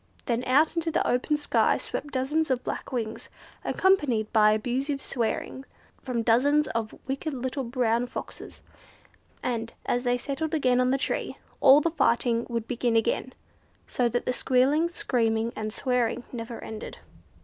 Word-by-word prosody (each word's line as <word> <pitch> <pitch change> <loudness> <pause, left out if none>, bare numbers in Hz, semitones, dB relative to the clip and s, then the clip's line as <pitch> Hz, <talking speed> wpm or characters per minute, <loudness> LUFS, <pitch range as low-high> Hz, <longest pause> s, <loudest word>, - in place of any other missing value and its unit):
Then 240 0 0
out 295 +6 +3
into 335 -1 0
the 325 - 0
open 255 +5 +1
sky 295 - +2
swept 290 - -5
dozens 290 +4 0
of 255 -2 0
black - - -5
wings, 225 -4 -4 0.3
accompanied 285 - +2
by 215 -1 +6
abusive 260 +6 -1
swearing 250 +1 -3 0.4
from 245 -3 -2
dozens 280 +6 +3
of 225 -1 -3
wicked 275 +3 -3
little 260 +2 -3
brown 240 -1 0
Foxes; - - -8 0.8
and, 230 -2 -2
as 245 - 0
they 245 -1 +1
settled 305 +5 -3
again 255 -4 +2
on 250 - +2
the 270 - +2
tree, - - -2 0.2
all 275 +2 +7
the 335 - 0
fighting 235 -5 +1
would 230 -1 -3
begin 240 -1 0
again, 230 +3 0 0.5
so 245 -1 0
that 245 +1 -2
the 250 - 0
squealing, 275 +7 +2
screaming, 230 -7 0
and 215 0 -4
swearing 250 0 0
never 230 -1 -6
ended. 220 -1 -7
250 Hz, 155 wpm, -27 LUFS, 230-275 Hz, 0.8 s, all